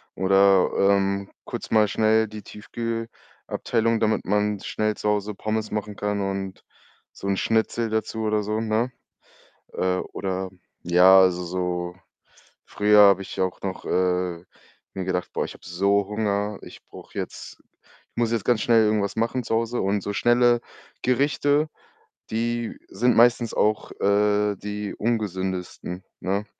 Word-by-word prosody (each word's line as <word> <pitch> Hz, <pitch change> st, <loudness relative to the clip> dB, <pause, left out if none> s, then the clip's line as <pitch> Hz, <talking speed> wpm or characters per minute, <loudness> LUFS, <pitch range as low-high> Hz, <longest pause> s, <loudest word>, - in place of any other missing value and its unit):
Oder, 95 Hz, 0 st, +4 dB
ähm, 100 Hz, 0 st, +2 dB, 0.2 s
kurz -, -, -6 dB
mal 110 Hz, -1 st, +5 dB
schnell 110 Hz, +1 st, +2 dB
die 110 Hz, 0 st, -9 dB
Tiefkühlabteilung, 115 Hz, +1 st, -3 dB
damit 110 Hz, 0 st, +1 dB
man 105 Hz, +1 st, +1 dB
schnell 110 Hz, 0 st, -1 dB
zu 105 Hz, -, -2 dB
Hause 105 Hz, 0 st, -1 dB
Pommes 110 Hz, +1 st, -2 dB
machen 105 Hz, -1 st, -4 dB
kann, 105 Hz, 0 st, -2 dB
und 95 Hz, -1 st, -4 dB, 0.5 s
so -, -, -7 dB
'n 100 Hz, -1 st, +1 dB
Schnitzel 115 Hz, +1 st, 0 dB
dazu 110 Hz, 0 st, -2 dB
oder 105 Hz, -1 st, +1 dB
so, 105 Hz, +1 st, -2 dB
ne? 115 Hz, +3 st, 0 dB, 0.8 s
Äh, 90 Hz, 0 st, 0 dB
oder 95 Hz, 0 st, -3 dB, 0.3 s
ja, 90 Hz, +2 st, +7 dB
also, 90 Hz, -1 st, +3 dB
so 90 Hz, 0 st, -3 dB, 0.7 s
früher 105 Hz, 0 st, +3 dB
habe 100 Hz, -1 st, +6 dB
ich 95 Hz, -, -8 dB
auch 95 Hz, -1 st, -2 dB
noch, 95 Hz, -1 st, -5 dB
äh, 90 Hz, -1 st, 0 dB, 0.5 s
mir 95 Hz, -1 st, -4 dB
gedacht: 90 Hz, -1 st, -2 dB
„Boah, -, -, -1 dB
ich -, -, -8 dB
habe -, -, -17 dB
so 100 Hz, +3 st, +1 dB
Hunger, 105 Hz, -1 st, -1 dB
ich -, -, -12 dB
brauche -, -, -13 dB
jetzt -, -, -6 dB, 0.5 s
ich -, -, -47 dB
muss 115 Hz, -1 st, +1 dB
jetzt 115 Hz, -3 st, -1 dB
ganz 120 Hz, -3 st, +2 dB
schnell 115 Hz, -2 st, +4 dB
irgendwas 105 Hz, -2 st, 0 dB
machen 115 Hz, +3 st, 0 dB
zu 115 Hz, -, -1 dB
Hause.“ 115 Hz, +1 st, -1 dB
Und 100 Hz, +1 st, 0 dB
so 100 Hz, -, -3 dB
schnelle 120 Hz, +2 st, +3 dB, 0.4 s
Gerichte, 145 Hz, +3 st, +2 dB, 0.6 s
die 120 Hz, +1 st, -2 dB
sind 120 Hz, +5 st, +1 dB
meistens 120 Hz, 0 st, +4 dB
auch, 105 Hz, 0 st, +1 dB
äh, 105 Hz, +1 st, +2 dB
die 105 Hz, +1 st, -5 dB
ungesündesten, 95 Hz, -4 st, -3 dB, 0.2 s
ne? 100 Hz, +3 st, -2 dB
105 Hz, 145 wpm, -24 LUFS, 95-110 Hz, 0.8 s, ja